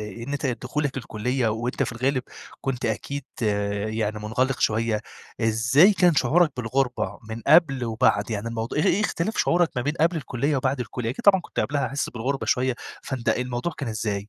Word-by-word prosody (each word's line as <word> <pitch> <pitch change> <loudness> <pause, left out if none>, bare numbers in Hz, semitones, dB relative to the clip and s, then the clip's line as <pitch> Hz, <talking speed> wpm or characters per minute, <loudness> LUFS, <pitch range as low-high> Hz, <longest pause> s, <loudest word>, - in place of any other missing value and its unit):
إن 115 +7 -5
ت 140 - -2
دخولك 135 +3 -2
الكلية، 125 0 -1
وأنت 115 +3 -2
في - - -2
الغالب 130 +2 0 0.4
كنت 135 -3 -3
أكيد 120 +6 -3 0.6
يعني 110 -1 -2
منغلق 125 +5 -1
شوية، 110 0 +1 0.4
إزاي 120 - +5
كان 180 -4 +4
شعورك 160 +2 +3
بالغربة 125 +1 -1
من 110 +1 -5
قبل 140 -4 +5
وبعد؟ 110 -2 +1
يعني 110 +1 -2
الموضوع 115 +3 -3
إ - - +3
إيه 190 - +3
اختلاف 205 0 -1
شعورك 175 -1 +3
ما 125 - 0
بين 145 +4 -1
قبل 170 +2 +3
الكلية 140 0 -1
وبعد 130 0 0
الكلية؟ 120 0 -3
أكيد 125 - -7
طبعًا 195 -2 +6
كنت - - -4
قبلها 145 0 0
حاسس 140 +1 -2
بالغربة 130 +4 -3
شوية، 130 0 +1 0.3
فأنت 130 -4 -4
الموضوع 125 +6 -1
كان 140 - -3
إزاي؟ 105 -2 -3
125 Hz, 175 wpm, -24 LUFS, 115-140 Hz, 0.6 s, طبعًا